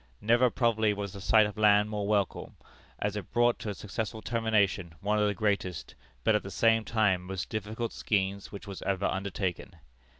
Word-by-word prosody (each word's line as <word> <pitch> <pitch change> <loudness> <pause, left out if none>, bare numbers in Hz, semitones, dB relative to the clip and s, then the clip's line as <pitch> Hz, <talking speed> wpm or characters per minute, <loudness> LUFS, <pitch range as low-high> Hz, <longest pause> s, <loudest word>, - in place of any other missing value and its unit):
Never, 120 +3 +4
probably, 110 -3 +1
was 100 -2 -5
the 100 - -8
sight 110 +2 +5
of 105 +1 -6
land 105 -1 +5
more 105 -1 -2
welcome, 100 -3 -1 0.4
as - - -2
it - - -6
brought 120 0 +3
to 110 - -5
a 100 - -4
successful 110 +2 -5
termination 105 -7 0
one 105 +3 0
of 105 - +3
the 105 - -1
greatest, 100 -5 -2 0.3
but, - - +4
at 105 - +2
the 95 - -8
same 115 +3 +3
time, 105 -5 +2
most 95 -1 -4
difficult 110 +2 -4
schemes 100 -1 -1
which 100 - -8
was 100 -2 -8
ever 100 0 -1
undertaken. 95 -1 -3
105 Hz, 190 wpm, -29 LUFS, 100-110 Hz, 0.4 s, sight